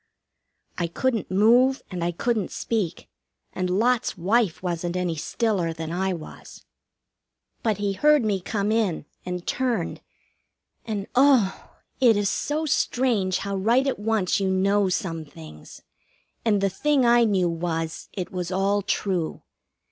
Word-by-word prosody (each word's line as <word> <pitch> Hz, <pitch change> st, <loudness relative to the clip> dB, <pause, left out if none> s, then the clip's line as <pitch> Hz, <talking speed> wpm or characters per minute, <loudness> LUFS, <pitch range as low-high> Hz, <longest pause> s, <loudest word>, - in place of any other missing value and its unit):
I 170 Hz, -, 0 dB
couldn't 230 Hz, +5 st, -1 dB
move, 240 Hz, +7 st, +4 dB
and 180 Hz, -2 st, -3 dB
I 175 Hz, -, 0 dB
couldn't 215 Hz, +2 st, -1 dB
speak, 210 Hz, -8 st, -3 dB, 0.5 s
and 185 Hz, -1 st, -2 dB
Lot's 230 Hz, +5 st, +1 dB
wife 195 Hz, 0 st, +1 dB
wasn't 175 Hz, -1 st, -2 dB
any 180 Hz, -2 st, -1 dB
stiller 180 Hz, +1 st, -1 dB
than 160 Hz, 0 st, -6 dB
I 190 Hz, +2 st, 0 dB
was. 165 Hz, -4 st, -9 dB, 1.0 s
But 220 Hz, -4 st, 0 dB
he 205 Hz, -1 st, -1 dB
heard 295 Hz, +4 st, +4 dB
me 205 Hz, -3 st, +1 dB
come 205 Hz, +2 st, -1 dB
in, 215 Hz, -9 st, 0 dB, 0.2 s
and 180 Hz, -1 st, -4 dB
turned, 255 Hz, -2 st, -1 dB, 0.8 s
and, 210 Hz, -3 st, -3 dB
oh! 255 Hz, -7 st, +3 dB, 0.2 s
it 235 Hz, -5 st, +5 dB
is 205 Hz, -1 st, +1 dB
so 305 Hz, +2 st, -1 dB
strange 240 Hz, -, +1 dB
how 200 Hz, 0 st, -3 dB
right 230 Hz, +7 st, +2 dB
at 270 Hz, -, -1 dB
once 210 Hz, -3 st, +1 dB
you 195 Hz, -1 st, 0 dB
know 195 Hz, +1 st, +2 dB
some 170 Hz, -4 st, -2 dB
things. 75 Hz, -, -13 dB, 0.6 s
And 210 Hz, -3 st, +2 dB
the 195 Hz, -, +2 dB
thing 275 Hz, +6 st, +2 dB
I 240 Hz, 0 st, +5 dB
knew 190 Hz, -5 st, +2 dB
was 165 Hz, -1 st, -3 dB
it 185 Hz, -3 st, -5 dB
was 180 Hz, -1 st, -4 dB
all 195 Hz, +2 st, +1 dB
true. 185 Hz, -4 st, -2 dB
200 Hz, 145 wpm, -24 LUFS, 180-230 Hz, 1.0 s, it